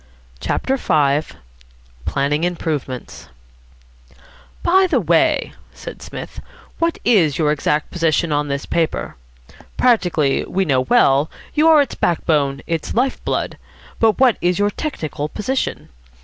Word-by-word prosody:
CHAPTER 265 - -1
V 150 - +1 0.7
PLANNING 145 +3 0
IMPROVEMENTS 155 -7 -4 1.3
"By 375 +2 +4
the - - +2
way," - - +2 0.2
said - - -9
Psmith, - - -8 0.4
"what 335 0 0
is 170 - +3
your 150 -2 +2
exact 150 0 -1
position 165 -2 +1
on 145 0 0
this 140 0 -3
paper? 165 -2 -2 0.6
Practically, 180 - +2
we 190 0 -1
know 135 -5 +2
well, 135 +3 +3 0.2
you 310 +1 +3
are 315 -2 +7
its - - -8
back 170 - -1
bone, 140 -3 +1
its 165 -2 -3
life 255 +3 0
blood; - - -2 0.4
but 225 -2 +3
what 255 -4 +4
is 175 0 +1
your 205 0 +1
technical 155 - -4
position? 255 - -3
165 Hz, 130 wpm, -19 LUFS, 145-230 Hz, 1.3 s, are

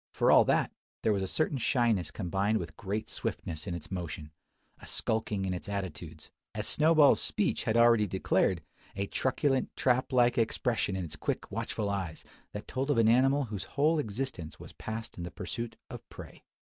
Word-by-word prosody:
For - - +2
all - - +8
that, - - +2 0.3
there 110 - +3
was 100 - 0
a 95 - -1
certain 145 +5 0
shyness 115 - +2
combined 100 +3 0
with 85 -5 -6
great 105 +5 -3
swiftness 80 -6 -4
in 85 - -2
its 85 - -9
motion, 80 -4 -5 0.5
a - - -11
skulking 110 -3 -1
in 95 - -1
its 90 +3 -5
attitudes: 85 -5 -6 0.2
as - - -2
Snowball's 155 -2 +5
speech - - 0
had 110 - +2
already 115 -2 +5
declared, 95 +1 +1 0.3
a 100 +1 -1
truculent, 130 +4 0
trap 130 +1 +1
like 120 -1 +4
expression 115 -3 0
in 95 -2 -2
its 75 -2 -8
quick 75 - -3
watchful 105 -2 -2
eyes, 95 -5 -4 0.3
that 105 - -7
told 135 +2 -2
of 145 - +2
an 115 -1 +5
animal 135 +4 +4
whose 105 -6 -5
whole 155 +3 +4
existence 110 - -4
was - - -11
passed 110 -2 -6
in - - -4
the 85 - -4
pursuit 115 +5 -5 0.2
of - - -9
prey. - - -12
110 Hz, 185 wpm, -30 LUFS, 95-125 Hz, 0.5 s, all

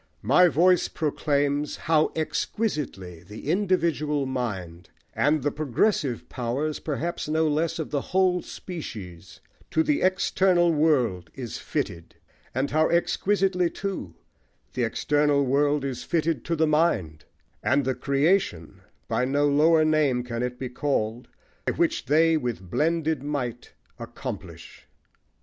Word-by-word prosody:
My 145 - +6
voice 175 +3 +3
proclaims 145 -1 -1
How 155 -1 +3
exquisitely 150 - -3
the 105 - -9
individual 165 -7 +1
mind 100 -10 -4 0.2
(And 150 -1 +2
the 145 - +1
progressive 145 - 0
powers, 130 +6 -2
perhaps, 160 +1 -3
no 160 +1 +2
less 155 +2 0
Of 160 - -5
the 145 -2 0
whole 185 +1 +1
species) 100 - -8 0.3
to 160 - +2
the 150 -2 +1
external 185 -2 +3
world 125 - +1
Is 120 -4 -6
fitted; 85 -1 -4 0.4
and 135 +2 0
how 155 +1 +3
exquisitely, 180 +1 +1
too, 185 - -5 0.6
The 125 -1 0
external 145 +3 +1
world 145 +2 +2
is 125 -2 -4
fitted 160 -3 0
to 165 - 0
the 160 0 +2
mind; 150 - +1 0.4
And 140 +1 +2
the 130 - +1
creation, 140 - 0 0.3
by 125 - 0
no 145 +2 +2
lower 155 +2 +4
name 150 -5 +2
Can 120 -1 -4
it 125 0 -3
be 130 -1 -5
called, 125 -3 -2 0.5
which - - 0
they 160 +3 +4
with 115 - -4
blended 160 -2 +1
might 130 -5 -4 0.3
Accomplish. - - -8
145 Hz, 125 wpm, -25 LUFS, 125-160 Hz, 0.6 s, My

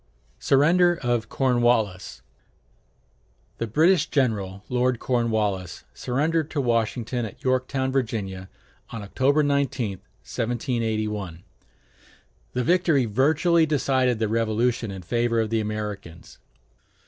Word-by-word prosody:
[Illustration: - - -10
SURRENDER 170 +5 +4
OF 120 -2 0
CORNWALLIS 120 - +1 1.4
The 115 - -2
British 165 - +3
general, 105 -8 -1
Lord 125 0 +1
Cornwallis, 110 -8 -1
surrendered 150 - -1
to 150 - -3
Washington 120 0 0
at 110 - -8
Yorktown, 130 +1 0
Virginia, 100 -8 -3 0.4
on 115 -3 -7
October 135 +9 +2
19, 140 -8 -1 0.2
1781. 110 - -3 1.1
The 125 - 0
victory 170 -5 +3
virtually 155 - +2
decided 130 -4 +1
the 110 0 0
Revolution 115 +1 0
in 95 -2 -7
favor 115 +4 0
of 110 -1 -1
the 115 - +1
Americans. 105 -6 -6
120 Hz, 105 wpm, -24 LUFS, 105-135 Hz, 1.4 s, SURRENDER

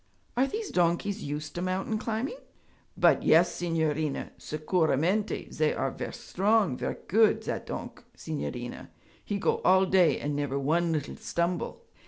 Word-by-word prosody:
'Are 260 +3 +3
these 430 +5 -4
donkeys 180 +4 +1
used 150 +1 -4
to 175 - -4
mountain 190 +4 -1
climbing?' 230 - -3 0.6
'But - - +5
yes, 170 +3 +5
signorina! 160 -3 -1
Sicuramente. 165 +5 0
Zay 155 -1 +1
are - - -1
ver' - - -5
strong, 205 - +1
ver' - - -3
good. 220 +3 +4
Zat - - -4
donk', - - -6
signorina, 125 -6 -5 0.3
he 205 - -2
go - - +1
all 190 +1 +5
day 185 -3 +4
and 145 0 -2
never 145 -1 -1
one 165 +5 +1
little 150 -3 -3
stumble.' 175 - -2
175 Hz, 145 wpm, -28 LUFS, 155-200 Hz, 0.6 s, But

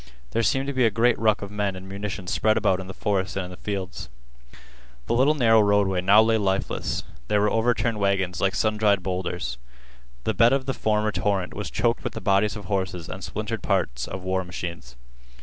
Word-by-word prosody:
There 115 - +1
seemed 135 +4 +1
to 140 - -3
be 130 -1 +2
a 115 - +5
great 115 +3 +2
ruck 110 -2 +2
of 100 - -7
men 105 -2 -1
and 95 +1 -9
munitions 100 -1 -5
spread 110 0 +2
about 95 - +2
in 95 - -7
the 95 - -7
forest 100 -2 -1
and 95 -1 -2
in 90 - -9
the 90 - -10
fields. 95 -10 -5 1.0
The - - -1
little 135 +6 +4
narrow 115 -5 +5
roadway 100 -3 +2
now 100 +4 +6
lay 110 0 +2
lifeless. 95 -1 -1 0.2
There 105 - +2
were 105 +1 +2
overturned 115 -1 +1
wagons 95 -3 0
like 95 0 +1
sun 110 -1 +1
dried 100 -3 +2
bowlders. 90 -8 -3 0.6
The 110 - 0
bed 115 +5 +5
of 135 -1 0
the 135 - -1
former 110 -2 0
torrent 100 -4 -1
was 105 - -5
choked 115 +1 0
with - - -3
the - - -5
bodies 100 0 +2
of 105 - -8
horses 95 -4 -2
and 95 - -7
splintered 110 +2 -4
parts 65 - -1
of 95 -1 -6
war 95 0 -1
machines. 85 -7 -7
100 Hz, 210 wpm, -25 LUFS, 95-110 Hz, 1.0 s, now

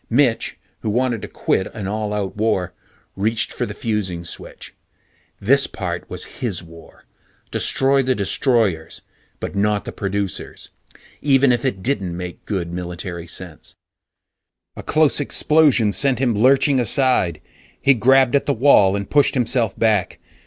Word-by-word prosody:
Mitch, 120 -1 +1 0.2
who 110 - -3
wanted 120 0 0
to - - -6
quit 95 - -1
an 105 -3 -5
all 105 +1 -3
out 105 -2 -3
war, 105 -4 0 0.4
reached 110 +3 0
for - - -3
the 105 - -6
fusing 100 -7 -3
switch. - - -9 0.7
This 135 +7 +3
part 90 -3 -5
was - - -7
his 100 -8 -2
war; 85 -1 -16 0.5
destroy 135 +1 +2
the 130 -1 0
destroyers, 100 - 0 0.4
but - - -5
not 105 +1 0
the - - -5
producers. 100 -1 -4 0.5
Even 135 -2 +4
if 120 -1 0
it 100 -9 -2
didn't 95 -10 -1
make 90 -1 -7
good 90 -5 -3
military 85 -1 -5
sense 85 -2 -9 1.0
A - - -7
close 155 -1 +2
explosion 145 -7 +3
sent 135 +1 +3
him 125 -2 +1
lurching 130 +5 +3
aside. 125 - +2 0.4
He 140 - +4
grabbed 130 +2 +4
at 140 - +1
the 140 - +2
wall 110 -6 +5
and 100 -1 -4
pushed 145 0 +3
himself 120 -4 0
back. 110 -5 +1
110 Hz, 145 wpm, -20 LUFS, 95-130 Hz, 1.0 s, wall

